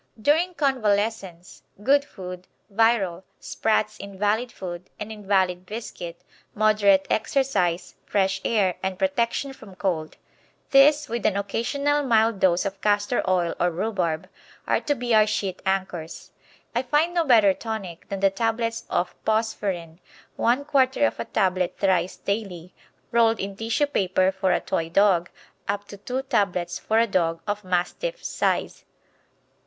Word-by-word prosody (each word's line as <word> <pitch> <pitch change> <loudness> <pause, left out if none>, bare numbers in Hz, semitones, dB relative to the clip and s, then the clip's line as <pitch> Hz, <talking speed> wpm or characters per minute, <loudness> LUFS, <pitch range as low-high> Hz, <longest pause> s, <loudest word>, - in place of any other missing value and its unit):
During 325 +9 +2
convalescence 210 - -1 0.2
good 280 +4 +4
food, 180 -5 -9 0.3
Virol, 200 -5 +2 0.2
Spratts' 215 -1 -1
invalid 205 +5 -1
food 180 -1 -7
and 210 +1 -6
invalid 190 -3 0
biscuit, 180 -6 -7 0.3
moderate 205 -2 +4
exercise, 200 -8 0
fresh 190 -1 0
air, 200 -5 +2
and 190 -1 -2
protection 275 -1 0
from 210 -7 -14
cold. 170 -5 -2 0.5
These, 290 +2 +6
with 235 -2 -3
an 200 - 0
occasional 280 +9 0
mild 225 -5 +2
dose 180 +1 +3
of 195 0 -4
castor 205 +3 +1
oil 175 -2 +1
or 175 - +3
rhubarb, 175 -3 -2 0.4
are - - +1
to 290 - 0
be 245 -2 -1
our 215 -1 +6
sheet 200 -3 -2
anchors. 185 -4 -3 0.4
I 240 - +1
find 295 +7 +1
no 345 -1 +2
better 220 -9 +5
tonic 200 -6 -6
than 195 -1 -4
the 195 -1 +4
tablets 230 +2 -1
of 175 - -1
Phosferine. 195 -7 -1 0.4
One 250 +5 +1
quarter 275 -1 +3
of - - -1
a - - -2
tablet 185 -4 0
thrice 185 -2 +1
daily, 195 -4 -4 0.4
rolled 230 -1 +3
in 195 0 -4
tissue 225 +7 0
paper, 190 -8 +1
for 190 -1 0
a - - +2
Toy 165 0 -2
dog, 180 -1 +3 0.4
up 205 0 -2
to 200 - -9
two 255 +6 -4
tablets 200 -9 0
for 220 - 0
a 230 - +5
dog 165 -5 0
of 210 0 -3
Mastiff 185 - -2
size. - - -1
205 Hz, 145 wpm, -24 LUFS, 185-235 Hz, 0.5 s, These